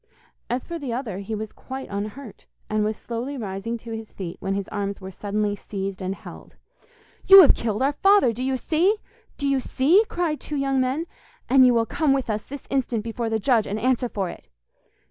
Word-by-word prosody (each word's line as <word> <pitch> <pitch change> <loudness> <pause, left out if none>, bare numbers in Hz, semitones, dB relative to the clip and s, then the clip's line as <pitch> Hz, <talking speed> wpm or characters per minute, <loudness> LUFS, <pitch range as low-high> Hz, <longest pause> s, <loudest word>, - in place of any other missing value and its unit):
As 245 +1 -1
for 340 -1 -5
the 275 -5 -4
other, 230 -6 -3
he 200 +2 -4
was 215 0 -5
quite 265 +1 -7
unhurt, 210 +4 -6 0.2
and 215 0 +2
was 215 0 -1
slowly 240 +4 -5
rising 210 +1 -4
to 230 0 -10
his 225 -1 -6
feet 175 -3 -6
when 195 0 -2
his 200 -1 -3
arms 200 -1 -3
were 190 -1 -8
suddenly 205 +1 -2
seized 195 -1 -5
and 190 +1 -2
held. - - -12 0.7
'You 390 -1 +11
have 290 - +7
killed 220 +1 -2
our 280 +2 +2
father, 390 - +4
do 245 +3 -4
you 265 0 0
see? 340 - +2 0.4
do 285 - -1
you 275 -1 +2
see?' 305 - +3
cried 335 -4 -1
two 300 - -6
young 270 -1 +1
men, 265 +6 -1 0.4
'and 260 -1 +6
you 245 - +4
will 230 -1 +3
come 295 +3 +1
with 265 -4 -1
us 210 0 -2
this 280 +1 -8
instant 245 -5 0
before 230 0 -3
the 220 - +1
judge, 225 0 +2
and 210 +2 -2
answer 250 +1 +1
for 195 -5 -2
it. - - -10
235 Hz, 210 wpm, -24 LUFS, 210-275 Hz, 0.7 s, You